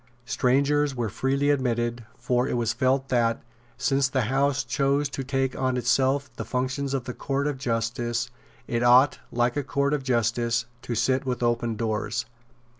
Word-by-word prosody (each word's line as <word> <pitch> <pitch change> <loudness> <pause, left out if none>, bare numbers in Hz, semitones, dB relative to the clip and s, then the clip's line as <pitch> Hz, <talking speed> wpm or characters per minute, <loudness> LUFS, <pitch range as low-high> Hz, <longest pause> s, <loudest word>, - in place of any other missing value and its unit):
Strangers 140 +3 +2
were 120 -3 -1
freely 140 +7 +1
admitted; 120 -3 -1
for 125 +1 0
it - - -1
was 115 -2 0
felt 130 +2 +1
that, 115 -2 +1 0.3
since 135 +1 +2
the 130 -2 0
House 135 +4 +1
chose 140 0 +1
to 135 - -4
take 135 -1 -1
on 130 -1 0
itself 130 +2 +1
the - - -3
functions 130 +2 -2
of 130 -1 -4
a 125 - -3
court 140 +2 -2
of 145 -3 -2
justice, 120 -1 -1 0.4
it 120 0 -1
ought, 125 +3 +5
like 120 +1 +1
a 145 - -1
court 140 +1 0
of 150 - 0
justice, 120 -2 0 0.2
to 120 - -4
sit 130 +4 +1
with 125 -2 -2
open 120 -1 0
doors. 110 +2 -2
130 Hz, 170 wpm, -26 LUFS, 120-135 Hz, 0.4 s, ought